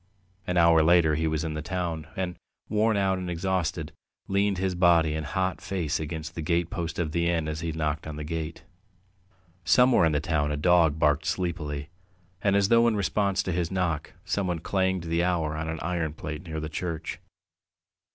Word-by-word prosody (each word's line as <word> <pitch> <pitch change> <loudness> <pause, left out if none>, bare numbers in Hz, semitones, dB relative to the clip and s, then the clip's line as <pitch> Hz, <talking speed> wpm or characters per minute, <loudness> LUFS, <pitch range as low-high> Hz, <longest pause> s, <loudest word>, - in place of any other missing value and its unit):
An 90 - 0
hour 85 -1 +6
later 80 -1 +5
he 80 +2 0
was 80 0 -1
in 80 -1 -3
the 75 - -4
town, 85 -2 -3
and, 90 -2 -2 0.3
worn 110 0 +2
out 95 -1 +1
and 90 -1 -4
exhausted, 85 -3 -1 0.4
leaned 100 0 +1
his 95 0 0
body 85 -3 +4
and 80 0 -2
hot 95 +3 -2
face 95 -6 -2
against 80 0 -5
the 80 - -5
gatepost 85 0 -1
of 80 -3 -1
the 85 +1 +1
inn 80 -3 0
as 75 0 -3
he 85 0 -2
knocked 75 -1 -2
at 75 - -5
the 75 - -5
gate. 80 +1 -5 1.0
Somewhere 125 +3 +5
in 80 - +3
the 75 - +1
town 75 -2 0
a 75 - -1
dog 80 -1 +4
barked 75 0 +2
sleepily, 75 -5 -2 0.5
and 100 -1 +2
as 100 0 +3
though 115 0 +5
in 115 - +2
response 100 -1 +1
to 95 - -2
his 85 -1 -1
knock, 90 -5 -2
someone 90 -4 -1
clanged 95 +1 0
the 85 +1 0
hour 85 -4 0
on 80 +1 -3
an 80 - -4
iron 85 -3 -2
plate 75 +2 -6
near 80 -1 -4
the 80 - -4
church. 80 0 -4
85 Hz, 190 wpm, -27 LUFS, 80-95 Hz, 1.0 s, hour